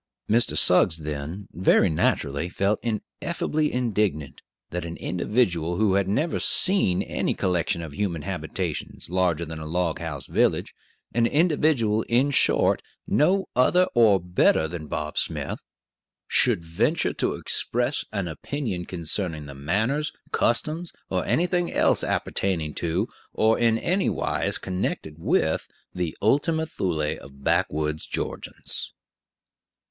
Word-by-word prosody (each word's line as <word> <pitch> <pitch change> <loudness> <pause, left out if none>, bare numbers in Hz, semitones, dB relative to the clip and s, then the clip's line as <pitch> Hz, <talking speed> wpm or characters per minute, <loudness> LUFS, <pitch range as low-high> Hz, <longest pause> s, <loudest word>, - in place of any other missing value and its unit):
Mr. 115 +2 +3
Suggs, 90 -2 +7
then, 75 +5 -6
very 95 +3 +4
naturally, 80 -1 0
felt 100 +3 0
ineffably 150 +6 -2
indignant 105 - -1 0.3
that 90 0 -3
an 85 0 -6
individual 90 -3 0
who 105 0 +2
had 100 -1 +2
never 150 - 0
seen 185 - +4
any - - -2
collection 85 -1 -1
of 80 -3 -8
human 85 -3 -2
habitations - - -4
larger 90 -3 +1
than 80 0 -7
a 80 - -7
log 85 0 -1
house 80 -4 -5
village - - +1 0.4
an 115 +1 +3
individual, 145 -8 +2
in 130 +5 +3
short, 135 - +3 0.2
no 190 +6 +2
other 180 +9 +4
or 110 -5 +5
better 90 -2 +2
than 80 -2 -7
Bob 75 0 -3
Smith - - -2 0.7
should 105 -10 +3
venture 110 - 0
to - - -1
express 125 +4 -1
an 100 -4 -2
opinion 95 - -4
concerning 85 -2 -2
the 70 - -9
manners, 110 - -1 0.2
customs, 155 +8 0 0.2
or - - 0
anything 175 +1 +1
else - - +3
appertaining 80 -6 -1
to, 85 +6 -1 0.3
or 110 +1 +2
in 115 -1 +3
any 185 +10 0
wise - - -1
connected 90 -4 -4
with, 80 -1 0 0.3
the 90 -3 -3
Ultima 160 +8 +2
Thule 80 - -2
of 70 0 -15
backwoods 75 +2 0
Georgians. - - -5
95 Hz, 130 wpm, -25 LUFS, 80-120 Hz, 0.7 s, Suggs